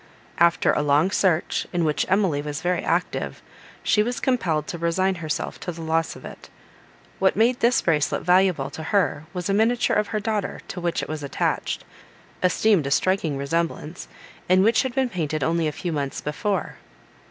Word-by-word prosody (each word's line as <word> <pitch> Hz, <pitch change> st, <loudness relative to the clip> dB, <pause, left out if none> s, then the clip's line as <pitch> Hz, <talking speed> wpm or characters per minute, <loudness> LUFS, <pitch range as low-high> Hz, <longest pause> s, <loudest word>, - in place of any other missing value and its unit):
After 170 Hz, 0 st, +4 dB
a -, -, +1 dB
long 150 Hz, +5 st, +3 dB
search, 180 Hz, -5 st, +1 dB
in 175 Hz, -2 st, 0 dB
which 150 Hz, -1 st, 0 dB
Emily 185 Hz, -7 st, +2 dB
was 150 Hz, +2 st, -5 dB
very 180 Hz, -1 st, 0 dB
active, -, -, -2 dB, 0.4 s
she 210 Hz, -, +3 dB
was 245 Hz, +3 st, -1 dB
compelled 180 Hz, -, 0 dB
to 170 Hz, -, -6 dB
resign 185 Hz, +3 st, +1 dB
herself 155 Hz, -1 st, -3 dB
to 180 Hz, -, -4 dB
the 165 Hz, -1 st, -8 dB
loss 160 Hz, 0 st, 0 dB
of -, -, -12 dB
it. -, -, -11 dB, 0.7 s
What 190 Hz, 0 st, +3 dB
made 235 Hz, +3 st, +3 dB
this 240 Hz, +2 st, +3 dB
bracelet 150 Hz, -4 st, +1 dB
valuable 180 Hz, -6 st, +3 dB
to 160 Hz, -, -7 dB
her 170 Hz, -3 st, 0 dB
was 180 Hz, -2 st, -4 dB
a 195 Hz, -, +1 dB
miniature 225 Hz, +4 st, +2 dB
of 210 Hz, 0 st, +1 dB
her 215 Hz, -, -2 dB
daughter 215 Hz, -1 st, -2 dB
to 180 Hz, -, -5 dB
which 170 Hz, -1 st, -1 dB
it -, -, -5 dB
was 155 Hz, -1 st, -5 dB
attached, 140 Hz, -, -2 dB, 0.6 s
esteemed 180 Hz, -3 st, +3 dB
a -, -, -1 dB
striking 165 Hz, -1 st, +1 dB
resemblance, 165 Hz, +2 st, -3 dB, 0.4 s
and 185 Hz, +1 st, +5 dB
which 225 Hz, +2 st, +4 dB
had 260 Hz, -2 st, -4 dB
been 265 Hz, -2 st, +1 dB
painted 155 Hz, -, -2 dB
only 165 Hz, +1 st, +1 dB
a -, -, -1 dB
few 175 Hz, +3 st, -4 dB
months 140 Hz, -3 st, -3 dB
before. 190 Hz, +6 st, -2 dB
175 Hz, 185 wpm, -24 LUFS, 155-200 Hz, 0.7 s, and